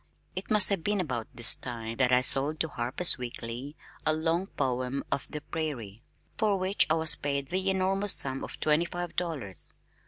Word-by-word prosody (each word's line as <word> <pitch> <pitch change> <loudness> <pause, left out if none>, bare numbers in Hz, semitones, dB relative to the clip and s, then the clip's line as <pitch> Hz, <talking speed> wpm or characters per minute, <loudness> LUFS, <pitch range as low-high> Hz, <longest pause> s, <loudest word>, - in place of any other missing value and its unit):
It - - -5
must 210 -3 +7
have 195 -5 -1
been 205 +1 0
about 125 -10 -3
this 120 0 +4
time 115 -2 -7
that 125 -2 +3
I 125 0 +5
sold 140 +4 +2
to 160 - 0
Harper's 130 +6 +3
Weekly 120 +3 -6 0.3
a 155 - +2
long 165 +4 0
poem 130 -1 -2
of 140 - -1
the 150 - -6
prairie, 130 - -5 0.4
for 210 -3 +2
which 185 +2 +2
I 155 - +3
was 160 -1 +4
paid 140 -1 -3
the 190 +1 -1
enormous 190 +1 +2
sum 135 -1 -1
of - - -8
twenty 155 +2 +2
five 175 0 -6
dollars. 145 - -4
150 Hz, 185 wpm, -28 LUFS, 125-175 Hz, 0.4 s, must